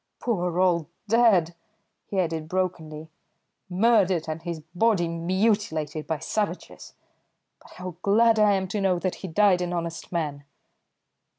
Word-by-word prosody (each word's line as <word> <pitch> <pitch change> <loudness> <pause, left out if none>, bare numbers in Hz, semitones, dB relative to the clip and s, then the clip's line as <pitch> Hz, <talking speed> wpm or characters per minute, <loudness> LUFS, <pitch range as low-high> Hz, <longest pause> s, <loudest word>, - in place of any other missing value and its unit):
Poor 180 -7 -1
old 175 -4 +2 0.2
dad," 205 -7 +4 0.5
he 195 - -2
added 160 -3 -2
brokenly, 160 -4 -3 0.6
"murdered, 190 -4 +2
and 155 +1 -4
his 170 -2 -5
body 190 -2 +2
mutilated 170 -3 -1
by 160 - -1
savages! 210 +6 -4 0.7
But - - -17
how 180 -2 -8
glad 220 +3 +4
I 210 -1 +5
am 190 -1 -1
to 205 +1 -2
know 190 -2 +2
that 185 +1 -2
he 190 - -5
died 185 +1 +3
an 175 0 -2
honest 170 -1 -5
man!" 150 -5 -3
180 Hz, 135 wpm, -25 LUFS, 165-200 Hz, 0.7 s, I